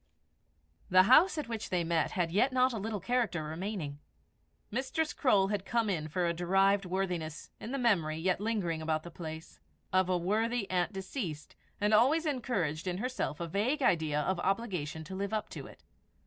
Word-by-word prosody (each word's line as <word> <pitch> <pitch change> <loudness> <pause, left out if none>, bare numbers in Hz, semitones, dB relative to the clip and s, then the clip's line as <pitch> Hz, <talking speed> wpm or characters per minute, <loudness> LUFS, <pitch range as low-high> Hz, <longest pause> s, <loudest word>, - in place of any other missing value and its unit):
The 185 0 +7
house 305 - +6
at 300 - -3
which 225 -2 -4
they 180 -2 +1
met 165 -1 0
had 175 -3 0
yet 215 +9 +3
not 255 0 +3
a 225 - -3
little 210 0 -3
character 225 -5 0
remaining. 160 -2 -4 0.7
Mistress 285 +7 -1
Croale 200 -7 +3
had 205 -2 -1
come 230 0 0
in 155 -4 -2
for 175 +3 -1
a 170 - +1
derived 195 +3 +2
worthiness, 180 -4 -3
in 230 - -6
the 275 - -1
memory, 180 - +2
yet 180 +3 0
lingering 200 -7 -1
about 155 0 -1
the 170 - -9
place, 160 - -8 0.3
of 185 0 +3
a 180 - +2
worthy 215 +5 0
aunt 180 +1 +1
deceased, 190 - -5 0.2
and 210 +1 +2
always 280 +10 +4
encouraged 200 - -1
in 180 -1 -1
herself 250 - -3
a 170 - -3
vague 235 - 0
idea 160 -8 +2
of 180 +4 0
obligation 180 -7 -2
to 170 - -9
live 200 +2 -3
up 215 - -3
to - - -8
it. - - -16
190 Hz, 185 wpm, -31 LUFS, 170-230 Hz, 0.7 s, The